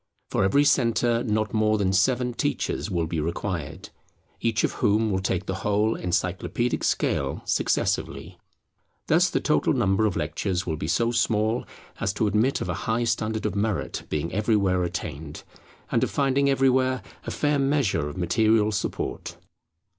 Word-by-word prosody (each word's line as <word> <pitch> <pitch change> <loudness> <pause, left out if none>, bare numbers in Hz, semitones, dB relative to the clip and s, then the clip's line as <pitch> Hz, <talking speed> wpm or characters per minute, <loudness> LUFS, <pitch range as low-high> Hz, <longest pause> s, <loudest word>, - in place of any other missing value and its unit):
For - - +1
every 140 +9 +4
centre 120 -4 +2
not 110 -1 -1
more 110 0 +2
than 95 -2 +1
seven 125 +5 +2
teachers 140 -3 -2
will 85 -4 0
be 80 0 -3
required; 85 0 -4 0.5
each 115 -2 0
of - - +2
whom 105 +1 +2
will 95 - +1
take 95 -1 -1
the 95 - -2
whole 105 +2 +1
Encyclopædic 95 +6 -1
scale - - 0
successively. - - -1 0.7
Thus - - +3
the - - 0
total - - +2
number 95 +3 +2
of 100 - -2
lectures 90 +4 -2
will 80 - -2
be 75 - -4
so 115 +7 +1
small 115 -1 +1 0.3
as 95 - -1
to 105 - 0
admit 105 +6 +1
of - - -3
a - - 0 0.2
high 115 +2 +1
standard 110 -1 -1
of 105 - 0
merit 105 -1 -2
being 75 +3 -2
everywhere 100 -3 +2
attained, 80 -3 -5 0.5
and - - +2
of - - +1
finding 140 0 +2
everywhere 130 -2 +2 0.2
a - - -1
fair 145 -1 0
measure 135 - +1
of 75 - -9
material 110 +4 +2
support. 100 - -4
105 Hz, 160 wpm, -25 LUFS, 95-120 Hz, 0.7 s, every